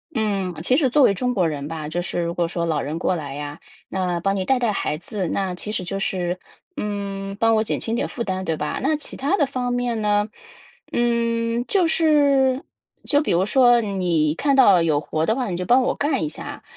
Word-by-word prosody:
嗯， 200 -5 -1
其 255 - +3
实 270 -3 +3
作 290 +3 +4
为 200 - +5
中 250 +6 -1
国 180 -5 +2
人 145 -2 -4
吧， 155 -1 -5
就 170 +3 -2
是 175 - -3
如 170 0 -2
果 170 -1 0
说 170 0 -2
老 155 -3 0
人 150 +4 -4
过 180 +1 0
来 145 -4 -5
呀， 145 +1 -6 0.3
那 180 -2 -1
帮 195 +3 0
你 190 - -1
带 265 +6 +2
带 240 -3 +1
孩 150 -6 -2
子， 185 +1 -4
那 190 -2 -1
其 195 +4 -5
实 205 - -2
就 195 +2 -4
是， 180 -2 -2 0.4
嗯， 200 -1 -4
帮 225 0 +4
我 220 - +2
减 - - -2
轻 225 - -3
点 235 - 0
负 235 - -4
担， 190 -3 -3
对 165 -3 -2
吧？ 150 - -3
那 300 +3 +1
其 295 - -7
他 290 +9 0
的 290 - +3
方 255 -2 -3
面 245 -2 -1
呢？ 210 0 +2 0.6
嗯， 235 0 0
就 380 -3 +3
是 285 -5 +3 0.4
就 290 0 +3
比 305 - -1
如 175 +2 +2
说 245 +1 +5
你 180 -7 0
看 280 - +1
到 200 -9 +6
有 155 -3 +2
活 155 +2 -2
的 220 - +2
话， 250 -4 -2
你 - - -2
就 180 - -2
帮 250 +6 +4
我 - - +1
干 285 -2 0
一 155 - 0
下， 150 - -7
200 Hz, 245 characters per minute, -22 LUFS, 175-245 Hz, 0.6 s, 到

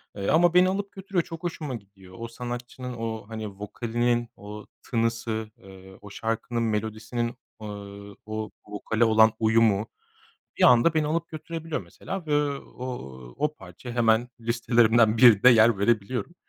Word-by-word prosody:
eee, 100 -1 -4
ama 175 +2 +4
beni 180 +1 +5
alıp 200 +1 -3
götürüyor, 190 -2 -2
çok 165 0 -9
hoşuma 155 -6 -4
gidiyor. 95 -3 -14
O 115 - -5
sanatçının 125 +1 -6
o, 115 -2 -5
hani, 110 -1 -5
vokalinin 120 +4 -2
o 105 +1 -10 0.2
tınısı, 115 -2 -2
eee, 95 0 -14
o 105 - -11
şarkının 115 +2 -2
melodisinin, 110 +2 -2 0.3
eee, 105 - -6 0.6
o 110 0 -4 0.2
vokale 110 +2 -1
olan 110 0 +5
uyumu 110 -1 +3 0.7
bir - - 0
anda 125 +6 +6
beni 155 -1 +1
alıp 165 +2 -1
götürebiliyor, 165 0 -5
mesela, 190 -3 -7
ve, 150 - +1 0.2
o 125 - -9 0.5
o 150 0 0
parçaya 95 - -10
hemen 115 0 +3
listelerimden 115 -1 +3
birinde 120 -1 +7
yer 115 -2 +5
verebiliyorum. 115 - 0
115 Hz, 140 wpm, -26 LUFS, 110-130 Hz, 0.7 s, birinde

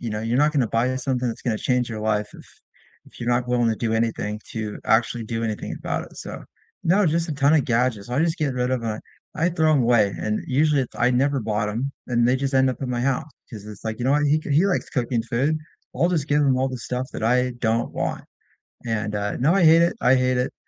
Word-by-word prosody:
you 115 -2 -4
know, 105 - -3
you're 115 +2 -1
not 150 +1 +3
gonna 135 -5 +2
buy 115 +3 +1
a 130 0 -1
something 125 -1 -1
that's 115 - -4
gonna 115 -4 0
change 125 -1 0
your 110 -2 -5
life 105 -1 0
if - - -13 0.6
if - - -17
you're 120 - -3
not 120 0 +1
willing 120 -1 +2
to 110 - -1
do 115 -2 -1
anything 110 -2 -1
to 110 -2 -4
actually 115 +1 +1
do 115 +1 -3
anything 110 -2 -3
about - - -3
it. - - -16
So - - -8 0.4
no, 190 +3 +3
just 165 +2 0
a - - -1
ton 140 +1 +3
of 150 -5 +3
gadgets, 115 -3 0
I 125 - 0
just 165 +2 +1
get 150 -4 0
rid 125 0 -1
of, 125 -3 -1
uh 110 -1 -2 0.4
I 165 +3 +1
throw 160 -3 +2
'em 140 -4 +3
away, 115 -4 +3
and 110 0 -1
usually 145 +1 +2
it 125 - -5
I 120 +1 +3
never 135 +2 +1
bought 105 -1 -1
'em, 125 +6 -2 0.2
and 120 -1 +2
they 125 - +3
just 135 +1 -2
end 130 0 +4
up 130 - -7
in 130 - -3
my 120 -1 -1
house 135 +4 -1 0.2
'cause 105 -4 -9
it's, 105 -2 -10
like, 110 +1 -3
"You 120 - -3
know 135 - +3
what? 145 0 +2
He 150 +2 +3
ca 155 - -8
he 155 +7 +4
likes 195 - -1
cooking 120 -4 -1
food. 130 +7 0 0.4
I'll 170 - +2
just 160 -5 -1
give 145 +1 +3
him 135 -3 +3
all 130 +1 +1
the 130 - -5
stuff 125 +2 -3
that - - -6
I 125 +3 +2
don't 115 0 0
want." - - -3 0.6
And, 110 -2 -2
uh, 105 0 -2
now 150 +8 +2
I 195 -3 +3
hate 165 +1 +7
it, 170 +6 +1
I 125 - +5
hate 130 -1 +2
it. 125 - -1
125 Hz, 265 wpm, -23 LUFS, 115-140 Hz, 0.6 s, hate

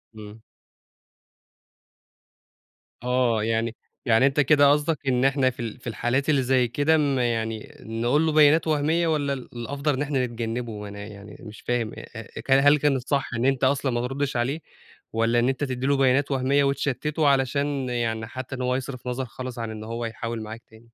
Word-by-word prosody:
إمم. 105 +1 -11 2.6
آه 125 -3 +1
يعني 115 0 -1 0.3
يعني 115 +2 +4
أنت 140 +1 +1
كده 145 0 +5
قصدك 150 +1 +1
إن 125 0 +2
إحنا 135 -1 +3
في 125 - -11
ال 115 0 -5
في 120 - -11
الحالات 120 +5 -1
اللي 140 -3 +3
زي 125 -1 +2
كده 145 +6 +2
م 140 -3 +1
يعني 115 -2 -2
نقول 120 +8 0
له 160 - +2
بيانات 155 +1 +5
وهميّة، 160 +3 +1
والّا 145 -3 0
ال 130 -2 -7
الأفضل 140 +5 -2
إن 130 - -2
إحنا 135 -3 0
نتجنّبه 115 -2 -4
أنا 100 0 -9
يعني 100 -1 -11
مش 105 - -11
فاهم؟ 120 -2 -1
أ - - -8
أ 115 -3 -8
كل 135 - +1
هل 145 +2 +6
كانت 135 -4 0
صح 140 -2 0
إن 120 +2 -1
أنت 135 -1 +1
أصلًا 135 0 +2
ما 120 +1 -1
تردش 135 -1 -2
عليه، 135 +7 -1 0.5
والّا 115 +1 +2
إن 120 +2 +2
أنت 135 +2 -2
تدّي 130 -1 -2
له 140 -1 +3
بيانات 135 +2 +2
وهميّة 135 +2 +2
وتشتته 145 +2 0
علشان 140 0 +1
يعني 115 -2 -2
حتى 130 +2 -6
إن 130 - -6
هو 125 0 0
يصرف 130 -1 -5
نظر 125 +1 -2
خالص 125 0 -7
عن 115 -1 -4
إن 110 0 -7
هو 115 +2 -4
يحاول 115 0 -4
معاك 110 +2 -8
تاني؟ 110 +1 -19
130 Hz, 190 wpm, -25 LUFS, 115-140 Hz, 2.6 s, هل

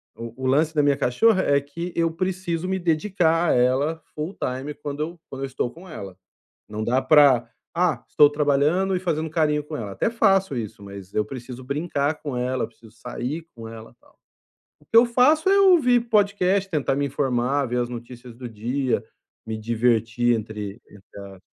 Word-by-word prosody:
o 115 +3 -9
o - - +2
lance 155 +4 +2
da 150 - +3
minha 145 -1 +3
cachorra 185 - +3
é 140 0 +3
que 170 +5 -7
eu 165 0 +2
preciso 185 0 -3
me 190 - -1
dedicar 170 -1 +1
a - - +4
ela 135 +6 +1
full 155 +6 -4
time 130 +4 -4
quando 145 0 -6
eu 165 +2 -4
quando 135 - -7
eu - - 0
estou 130 -2 -2
com 180 +6 -14
ela, 100 - -9 0.5
não 110 +1 -5
dá 125 +3 +1
pra: 130 -4 +5 0.3
"Ah, 175 -1 +1
estou 145 -1 +6
trabalhando 150 +6 +1
e - - 0
fazendo 160 -3 -2
carinho 150 -2 +1
com 150 +1 -7
ela", 105 -5 -5
até 95 - 0
faço 195 - +2
isso, 105 -3 -6
mas 100 -1 -10
eu 105 - +2
preciso 125 +2 -8
brincar 145 +2 -2
com 140 -4 -4
ela, 125 +1 -1
eu - - -2
preciso 115 -1 -19
sair 125 +8 -6
com 115 -1 -9
ela 110 0 -10
e - - -27
tal. - - -26 0.6
O - - -25
que - - -5
eu 235 - +8
faço 300 +9 +3
é 395 0 +5
ouvir 310 -11 +5
podcast, 200 -2 +2
tentar 145 -4 0
me 145 - 0
informar, 135 0 0
ver 125 0 -2
as 120 - -3
notícias 120 0 -9
do 125 0 -7
dia, 120 +4 -2 0.4
me 110 -1 -4
divertir 115 +1 +1
entre 105 -1 -6
entre 100 0 -15
a 100 -1 -11
140 Hz, 195 wpm, -23 LUFS, 120-170 Hz, 0.6 s, eu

